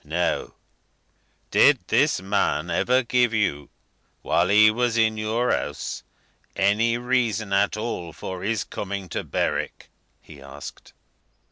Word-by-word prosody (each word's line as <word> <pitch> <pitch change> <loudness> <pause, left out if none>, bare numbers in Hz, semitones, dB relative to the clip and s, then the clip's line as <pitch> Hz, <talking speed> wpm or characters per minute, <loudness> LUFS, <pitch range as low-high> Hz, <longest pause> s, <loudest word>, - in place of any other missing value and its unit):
"Now, 85 +4 -2 1.0
did - - +6
this - - +2
man 95 -4 0
ever 125 +1 +2
give 120 -1 +2
you, 75 -10 -1 0.5
while 85 +2 +2
he 110 +2 +6
was 120 0 0
in 110 -1 +3
your 110 +3 0
house, 75 - -3 0.5
any 105 +4 +2
reason 120 -5 0
at 100 +1 +2
all 105 -7 -4
for 95 +3 -7
his 105 -1 -1
coming 100 -1 -6
to - - -3
Berwick?" - - -3 0.3
he 70 -3 -15
asked. 70 +1 -11
105 Hz, 125 wpm, -24 LUFS, 90-115 Hz, 1.0 s, did